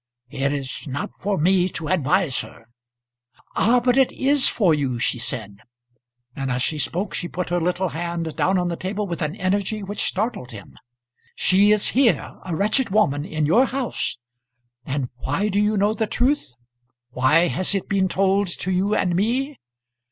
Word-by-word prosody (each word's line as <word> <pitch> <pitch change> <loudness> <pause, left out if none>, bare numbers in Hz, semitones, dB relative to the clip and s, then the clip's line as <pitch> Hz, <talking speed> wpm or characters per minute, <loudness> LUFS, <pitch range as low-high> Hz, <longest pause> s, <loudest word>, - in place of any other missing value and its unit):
It 140 -1 -1
is 140 +1 -5
not 140 +1 -4
for 200 0 0
me 180 +3 +3
to 165 -3 -6
advise 160 -3 +1
her." 110 +1 -9 0.9
"Ah, 240 +5 +4
but 250 +1 +2
it 265 -2 +4
is 275 +1 +3
for 185 -8 +2
you," 135 -5 -1
she 120 0 0
said; 105 -4 -4 0.8
and 135 -1 -3
as 125 0 0
she 155 +2 -1
spoke 175 +7 -2
she 175 - -2
put 180 -1 -4
her 175 0 +1
little 180 +2 0
hand 165 +1 -4
down 190 +1 +2
on 180 -1 0
the 170 - -2
table 200 +4 -3
with 170 -4 -5
an 155 +2 -2
energy 200 +2 -1
which 200 +1 -4
startled 195 - -2
him. 105 -4 -11 0.6
"She 200 +3 +4
is 210 -1 +3
here 255 -2 +2
a 180 -3 -3
wretched 215 +8 +1
woman, 165 -9 +2
in 155 -2 -1
your 230 - +4
house. 255 - -2 0.7
And 135 -2 -2
why 145 +12 -1
do 200 0 +1
you 210 0 +2
know 205 +2 +2
the 220 0 -1
truth? 245 - 0 0.6
Why 150 +7 +3
has 185 +3 0
it 195 - -2
been 195 -1 +1
told 195 +2 +1
to 180 +1 -3
you 195 +3 +1
and 180 -2 +1
me? 255 +8 -1
185 Hz, 180 wpm, -22 LUFS, 150-210 Hz, 0.9 s, Ah